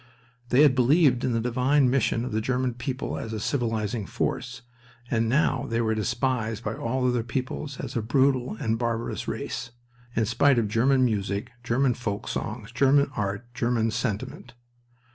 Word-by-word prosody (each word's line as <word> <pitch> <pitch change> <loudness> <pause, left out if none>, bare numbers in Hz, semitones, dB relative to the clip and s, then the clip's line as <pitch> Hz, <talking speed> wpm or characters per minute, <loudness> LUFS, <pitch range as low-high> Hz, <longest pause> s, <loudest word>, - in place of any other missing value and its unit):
They 130 +4 +5
had 145 -4 +6
believed 130 0 +4
in 125 - +1
the 115 - +1
divine 125 +4 +2
mission 125 -2 +1
of 125 - -4
the 110 - 0
German 125 +1 0
people 130 +2 -4
as 115 - -5
a 110 - -3
civilizing 110 -4 -1
force, 125 -1 -3 0.5
and 115 -1 +1
now 145 +7 +1
they 115 0 0
were 110 -1 +1
despised 115 0 -1
by - - -2
all 125 +2 -1
other 125 -1 +1
peoples 130 +4 -4
as - - -6
a 115 - +1
brutal 130 +1 +2
and 110 0 -1
barbarous 115 -1 -2
race, - - -4 0.5
in 115 - +2
spite 120 +4 +3
of 115 -3 +2
German 130 +4 +3
music, 100 -3 -2
German 125 +2 +2
folk 110 -4 -4
songs, 105 +1 -4
German 140 +3 +3
art, 100 +2 -2
German 115 -1 0
sentiment. 115 +1 -4
120 Hz, 165 wpm, -26 LUFS, 115-130 Hz, 0.5 s, had